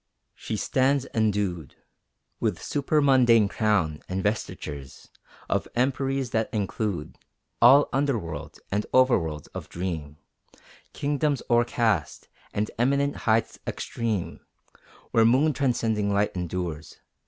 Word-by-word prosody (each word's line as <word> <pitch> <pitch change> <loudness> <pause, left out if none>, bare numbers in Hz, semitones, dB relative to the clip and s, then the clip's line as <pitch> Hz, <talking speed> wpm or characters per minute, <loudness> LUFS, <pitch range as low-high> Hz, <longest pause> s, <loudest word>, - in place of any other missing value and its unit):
She 110 - -5
stands 135 +5 +1
endued 100 - -1 0.6
With 105 -6 0
supermundane 130 - +3
crown, 100 -8 0
and 95 +1 -2
vestitures 75 - -4 0.4
Of - - -1
emperies 135 0 0
that 110 -1 0
include 100 -5 -3 0.4
All 135 +5 +7
under 140 -2 +1
worlds 80 -7 -7
and 105 +2 -1
over 130 -2 +5
worlds 75 -3 -5
of - - -8
dream 80 -5 -5 0.8
Kingdoms 145 -1 0
o'ercast, 115 -7 +1 0.2
and 105 +1 -2
eminent 140 +3 +2
heights 110 0 0
extreme 110 -6 -3 0.7
Where 115 - +4
moon 135 +7 +4
transcending 115 -6 0
light 100 0 +1
endures. 85 -3 -4
110 Hz, 110 wpm, -26 LUFS, 90-130 Hz, 0.8 s, All